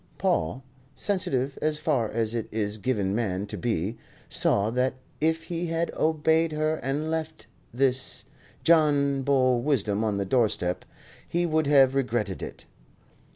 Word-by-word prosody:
Paul, 85 +12 0 0.3
sensitive 140 -9 0
as 155 0 +1
far 140 -8 0
as 115 0 -1
it 115 -2 -2
is 105 -1 -2
given 100 -5 0
man 100 -4 -1
to 100 - -7
be, 110 -2 -2 0.3
saw 105 +2 +2
that 125 +2 0 0.2
if 160 +1 +1
he 170 +1 -3
had 165 +1 -1
obeyed 160 +1 +2
her 155 +1 0
and 145 +4 -2
left 160 -1 -4 0.3
his 130 +1 +1 0.4
John 145 -4 +4
Bull 130 -3 +2
wisdom 110 -7 0
on 105 -2 0
the 100 - -1
doorstep, 100 -6 0 0.4
he 175 +1 0
would 155 -2 +1
have 135 -2 +5
regretted 120 -7 -1
it. - - -8
130 Hz, 145 wpm, -26 LUFS, 110-155 Hz, 0.4 s, have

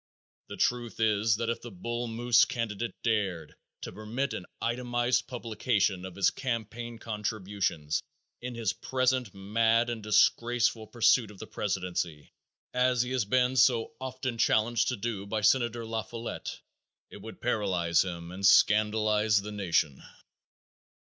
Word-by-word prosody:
The - - -8
truth 120 -2 0
is 110 -1 +3
that 115 +1 -1
if 115 - -5
the 120 - -8
Bull 120 +5 -4
Moose 115 +1 +4
candidate 115 -1 -3
dared 100 -9 -1 0.3
to - - -6
permit 120 +6 -3
an 90 - -6
itemized 120 0 0
publication 110 -6 -1
of 95 - -8
his 100 - +3
campaign 120 -1 -4
contributions 100 -8 -2 0.4
in 125 0 -5
his 115 -4 -1
present 130 -3 0
mad 115 +4 +2
and 115 -2 -5
disgraceful 115 +2 +2
pursuit 115 -1 +3
of 105 - -13
the 110 - -8
presidency, 90 -7 -3 0.4
as 125 -1 +2
he 125 - -6
has 130 -4 0
been 125 +4 +2
so 125 0 +3
often 130 -2 -4
challenged 115 +1 +2
to 125 - 0
do 100 -2 -4
by 110 +1 -2
Senator 120 0 +2
La 110 0 -2
Follette, 115 +1 -6 0.5
it - - -9
would - - -10
paralyze 90 -6 +1
him 85 -2 -6
and 95 +2 -8
scandalize 105 +1 +4
the 105 +1 -7
nation. 85 -8 0
115 Hz, 145 wpm, -29 LUFS, 100-120 Hz, 0.5 s, Moose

